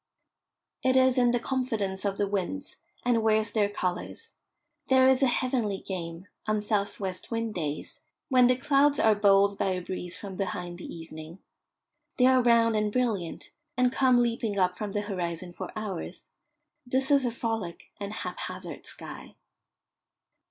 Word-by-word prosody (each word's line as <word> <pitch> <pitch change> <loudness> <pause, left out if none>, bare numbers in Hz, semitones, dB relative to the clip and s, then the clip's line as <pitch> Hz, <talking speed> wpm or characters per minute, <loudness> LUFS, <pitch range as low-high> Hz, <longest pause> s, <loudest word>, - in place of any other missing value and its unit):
It 260 -1 +2
is 260 -1 +5
in 245 -1 +4
the 240 0 +2
confidence 220 -7 -1
of 200 -1 -1
the 205 - +1
winds, 205 +9 -3 0.3
and 240 -2 +3
wears 220 0 +2
their 210 -2 +2
colours. 185 - -4 0.5
There 260 0 +5
is 260 0 +5
a 270 - +5
heavenly 240 -5 0
game, 175 -1 -6 0.2
on 215 0 +2
south 205 -1 -1
west 190 -2 -4
wind 230 -1 -2
days, 155 -5 -4 0.3
when 255 -3 +5
the 250 - +4
clouds 280 +2 +3
are 220 - +5
bowled 200 -1 +4
by - - +1
a 185 - -2
breeze 180 0 -6
from 195 -2 -7
behind 180 -3 -4
the - - -8
evening. 160 0 -9 0.8
They 250 - +5
are 260 0 +6
round 230 -2 +4
and 210 -1 +1
brilliant, 215 -8 -2 0.3
and 250 0 +3
come 255 -2 +4
leaping 230 -3 -1
up 180 -1 +2
from 210 +2 -4
the 205 +1 -1
horizon 180 -3 -4
for - - -6
hours. 210 -5 -6 0.5
This 260 +2 0
is 280 -2 +5
a 245 - +1
frolic 225 -7 -4
and 200 0 -4
haphazard - - -6
sky. - - -10
215 Hz, 160 wpm, -28 LUFS, 190-250 Hz, 0.8 s, are